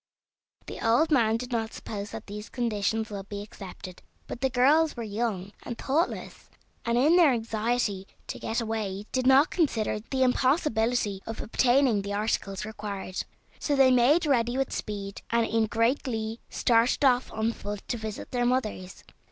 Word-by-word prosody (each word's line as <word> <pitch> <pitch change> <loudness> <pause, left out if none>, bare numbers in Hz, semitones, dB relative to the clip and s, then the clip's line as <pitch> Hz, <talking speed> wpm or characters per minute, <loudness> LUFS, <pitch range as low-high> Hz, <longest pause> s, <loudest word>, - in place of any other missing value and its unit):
The - - -7
old 240 +8 +3
man 225 -6 +3
did 250 +2 -7
not 225 -2 -2
suppose 205 -1 -6
that - - -8
these 210 +1 -8
conditions 220 -2 -1
would 200 -1 -7
be 205 0 -5
accepted, 190 -2 -10 0.2
but 245 - -7
the 265 - +2
girls 285 +5 +3
were 235 - -3
young 205 -3 -3
and 235 - -6
thoughtless, 305 +6 -2 0.3
and 235 0 0
in 305 +8 +5
their 330 -6 +6
anxiety 225 -3 -1 0.2
to - - -6
get 225 - -2
away 210 -3 -3
did 255 -1 0
not 270 +5 +6
consider 230 - 0
the 260 +4 -1
impossibility 245 - +1
of 225 - -5
obtaining 245 -1 +3
the 200 +1 -4
articles 205 -2 -1
required. 205 -3 -5 0.4
So 290 - 0
they 270 -1 +6
made 265 +7 +4
ready 245 -3 +1
with 270 -1 -1
speed, 200 -2 -5
and 235 0 +2
in 225 -1 +1
great 230 +5 +1
glee 225 -3 -3
started 240 +4 +2
off 250 -1 +3
on 220 +1 0
foot 205 -1 -7
to 240 - -1
visit 215 -1 -6
their 245 -1 0
mothers. 215 -7 -2
230 Hz, 170 wpm, -27 LUFS, 210-255 Hz, 0.4 s, their